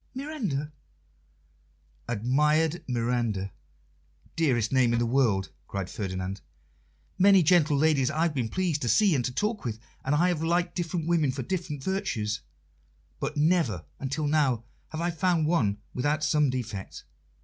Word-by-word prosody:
"Miranda." 230 - -3 1.4
"Admired 150 +8 +1
Miranda! 115 -5 -1 0.8
Dearest 125 -9 +1
name 130 -3 +3
in - - +2
the 120 - +1
world!" 115 -6 +1 0.2
cried 95 -2 -4
Ferdinand. 95 -1 -4 0.8
"Many 195 -1 +6
gentle 155 -3 +4
ladies 140 -3 +3
I 155 +1 0
have 170 -2 +1
been 125 -5 -1
pleased 175 -3 -1
to 120 - -1
see 200 - +4
and 130 -4 +1
to 125 - -2
talk 210 - -1
with, 115 -3 -3 0.3
and 140 +2 +1
I 175 +4 +3
have 170 -3 -1
liked 170 +2 +1
different 170 -2 -2
women 160 -5 +2
for 130 0 -4
different 155 -3 -4
virtues; 120 - -2 0.8
but 150 +2 -3
never 150 - +2
until 140 +3 -2
now 145 -6 +2 0.3
have 155 - -5
I 175 +1 0
found 170 -1 +1
one 125 -12 +1 0.2
without 145 +4 0
some 150 -2 +3
defect. 115 -7 -5
145 Hz, 150 wpm, -27 LUFS, 120-170 Hz, 1.4 s, Many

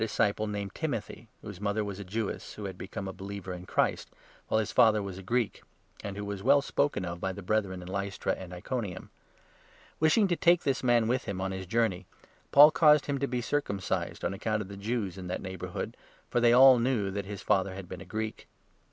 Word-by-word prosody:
disciple, 110 -1 +1
named 100 -1 -4
Timothy, 120 -6 -4 0.2
whose 100 -3 -8
mother 105 +1 0
was 100 -1 -5
a - - -5
Jewess 105 +3 -4
who 105 - -7
had 95 -2 -5
become 95 +1 -6
a 95 - -5
believer 95 -1 -6
in 90 0 -9
Christ, - - 0 0.4
while 110 - +2
his 110 - -2
father 110 -1 +5
was 100 -2 -5
a - - -8
Greek, 115 +4 -1 0.4
and 100 -1 -5
who 100 - -4
was 100 -1 -5
well 140 +5 +4
spoken 140 -10 0
of 85 0 -6
by 95 - -1
the 100 +1 -8
Brethren 95 -2 -1
in - - -10
2 95 - -7
Lystra 100 0 -2
and 95 -1 -8
Iconium. 95 +1 -5 0.9
Wishing 160 +7 +4
to 175 - +1
take 175 +1 +4
this 135 -3 0
man 120 -3 +3
with 125 +2 0
him 100 -3 -4
on 95 0 -2
3 95 - -4
his 95 - -8
journey, 110 -3 0 0.4
Paul 145 +2 +9
caused 150 -1 +5
him 140 -1 -1
to 140 - 0
be 125 -1 -2
circumcised 110 -7 -2
on - - 0
account 105 +2 -1
of 95 - -12
the 100 - -7
Jews 100 -2 -3
in 90 - -7
that 90 - -3
neighbourhood, 95 -1 -5 0.4
for 120 - +2
they 120 0 +5
all 130 0 +8
knew 115 -5 0
that 100 0 -3
his 100 -1 -7
father 95 0 +1
had 95 -2 -8
been 90 0 -8
a - - -9
Greek. 110 0 -5
100 Hz, 225 wpm, -29 LUFS, 95-120 Hz, 0.9 s, Paul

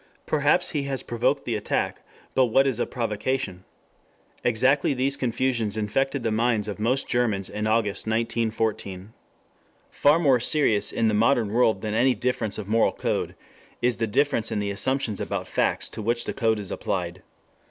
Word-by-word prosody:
Perhaps 155 +4 +2
he 150 - -1
has 135 -1 -2
provoked 125 +4 0
the 120 - -2
attack. 105 - -2 0.3
But 130 -1 +4
what 135 +4 +4
is 130 -4 0
a - - 0
provocation? 110 -4 -3 0.8
Exactly 130 +4 +2
these 135 +2 +2
confusions 120 -4 -1
infected 135 +5 -1
the 115 - 0
minds 110 -1 +1
of 105 -1 -5
most 125 +5 0
Germans 110 -6 0
in 105 +1 -2
August, 110 -2 0
1914. 110 -3 -2 0.8
Far 145 +2 +4
more 140 -7 +3
serious 115 -6 +2
in 115 - 0
the 110 - +2
modern 115 -1 +2
world 115 -5 +3
than 105 -1 -3
any 125 +3 +3
difference 120 -4 -1
of 105 - -6
moral 115 +2 +2
code - - -2 0.4
is 125 0 +1
the 115 - -1
difference 115 -1 +1
in - - -1
the 100 -1 -1
assumptions 115 0 -1
about - - -3
facts - - 0
to - - -7
which 120 +2 -1
the - - -3
code 110 -3 +1
is 100 -3 -5
applied. 90 -1 -3
115 Hz, 170 wpm, -25 LUFS, 105-130 Hz, 0.8 s, But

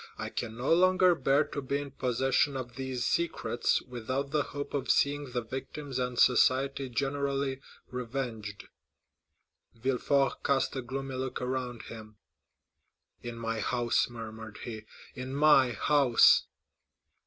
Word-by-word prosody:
I - - -4
can 115 -1 -4
no 130 +6 +2
longer 185 +1 +5
bear 140 -1 +2
to 145 - -5
be 140 +1 -1
in 145 -1 -6
possession 135 +2 +1
of 125 -2 -6
these 130 -1 -3
secrets 170 -7 0
without 130 +3 -4
the 150 -1 +2
hope 145 0 -6
of 135 -2 -2
seeing 145 +1 +2
the 120 -1 -2
victims 135 +3 -5
and 125 -1 -2
society 135 +2 +3
generally 135 +1 -1 0.3
revenged." 120 -5 -5 1.1
Villefort 135 +3 +1
cast 140 -1 +1
a 130 - -2
gloomy 135 +1 -5
look 130 0 -3
around 125 -2 -3
him. 110 -1 -10 1.0
"In 120 -1 -6
my 115 -1 -3
house," 120 0 +1
murmured 110 -2 -8
he, 110 -3 -7 0.3
"in 130 +1 -6
my 140 -4 +5
house!" 135 +1 +5
130 Hz, 130 wpm, -30 LUFS, 120-140 Hz, 1.1 s, longer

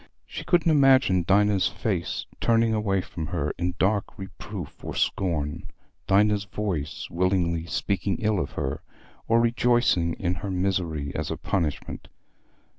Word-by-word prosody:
She - - -7
couldn't 170 -2 +3
imagine 130 - +4
Dinah's 100 0 +4
face - - -2
turning 115 -1 +3
away 100 -3 +1
from 80 -3 -6
her 75 -3 -2
in 90 0 -1
dark 100 +1 0
reproof 95 -4 -8
or - - -5
scorn, 80 -4 -1 0.4
Dinah's 105 +1 +3
voice 95 -7 -3
willingly 85 -2 0
speaking 100 +2 -1
ill 110 -3 +1
of - - -3
her, 65 - -3 0.5
or 115 +1 +4
rejoicing 120 -7 +2
in 90 -1 -1
her 100 - -4
misery 90 -6 -1
as - - -3
a - - -3
punishment. 80 -7 -3
95 Hz, 135 wpm, -26 LUFS, 85-105 Hz, 0.5 s, imagine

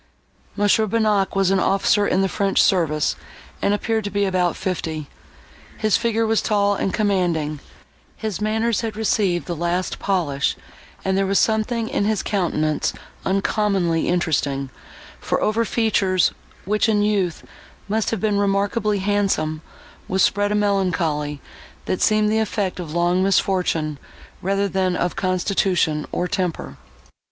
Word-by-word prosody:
M. 205 - 0 0.3
Bonnac 210 -3 +1
was 195 -1 +2
an 195 - +3
officer 200 +2 +2
in 190 - +2
the - - +2
French 195 +1 0
service, 155 -5 +2 0.5
and - - +2
appeared 220 +1 0
to - - -2
be 205 0 0
about 180 -2 +1
fifty; 160 -4 -3 0.7
his 215 -2 +2
figure 230 -1 +1
was 225 0 +2
tall 205 -1 +2
and 195 - -1
commanding, 175 -8 0 0.6
his 215 -3 -4
manners 220 +1 0
had 225 -2 -4
received 200 -5 0
the 175 - -3
last 175 +2 -2
polish, 160 -8 0 0.5
and 190 0 +1
there 195 0 +1
was 195 0 +2
something 225 +1 +1
in 200 - -1
his 215 0 0
countenance 155 -6 0 0.3
uncommonly 195 -4 +1
interesting; 140 -6 0 0.5
for - - -1
over 220 +2 +1
features, 200 -5 +2 0.3
which, 210 +3 +1
in 205 -1 +2
youth, 195 -5 0 0.4
must 215 +1 0
have 225 - -2
been 205 0 +1
remarkably 205 +2 +1
handsome, 190 -6 0 0.5
was 190 0 +2
spread 205 +1 +2
a - - +1
melancholy, 170 -8 0 0.5
that 185 - -2
seemed 215 -1 +3
the 220 - +2
effect 205 -4 -2
of 165 -4 -6
long 175 +1 +2
misfortune, 180 -6 +1 0.4
rather 195 +2 0
than 185 -1 0
of 175 0 -1
constitution, 185 -4 0
or 180 - -1
temper. 165 - -3
195 Hz, 145 wpm, -21 LUFS, 175-210 Hz, 0.7 s, an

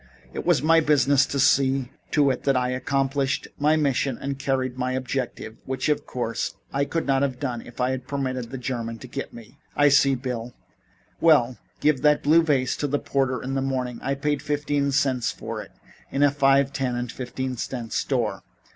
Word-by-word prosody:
It - - -5
was 130 - +3
my 165 +1 +5
business 140 -3 +3
to 140 - -3
see 135 -1 +3 0.2
to 145 -2 +3
it - - -3
that 135 -2 +3
I 125 0 0
accomplished 135 +1 -1
my 150 +2 +4
mission 140 -4 0
and 140 0 -4
carried 130 -2 -1
my 130 0 -2
objective, 130 -4 -4
which, 130 +2 -1
of 150 - 0
course, 120 -2 -3 0.2
I 140 +1 +1
could 165 +3 -2
not 135 -1 +2
have 130 -3 -1
done 125 -4 -3
if 120 - -14
I 125 +1 +1
had 130 -1 -4
permitted 130 -4 -3
the 135 - -6
German 120 -2 -4
to 125 - -10
get 135 +3 -5
me." 115 0 -13 0.2
"I 145 0 +5
see, 140 -1 +4
Bill. 125 -2 -5 0.6
Well, 130 -7 +4 0.2
give 150 -3 +2
that 150 -1 +3
blue 160 +3 +6
vase 140 -6 +1
to 145 - -1
the 145 +1 0
porter 130 -4 -1
in 130 +1 -3
the 135 - 0
morning. 130 -3 -2
I 135 - -1
paid 145 +1 -1
fifteen 145 -1 0
cents 130 -3 +1
for - - -6
it - - -12 0.4
in 140 - +1
a 145 - +5
five, 140 -1 +3
ten 130 -3 -1
and 120 -1 -3
fifteen 130 0 -4
cent 120 -1 -5
store. 115 -8 -1
135 Hz, 200 wpm, -24 LUFS, 125-140 Hz, 0.6 s, blue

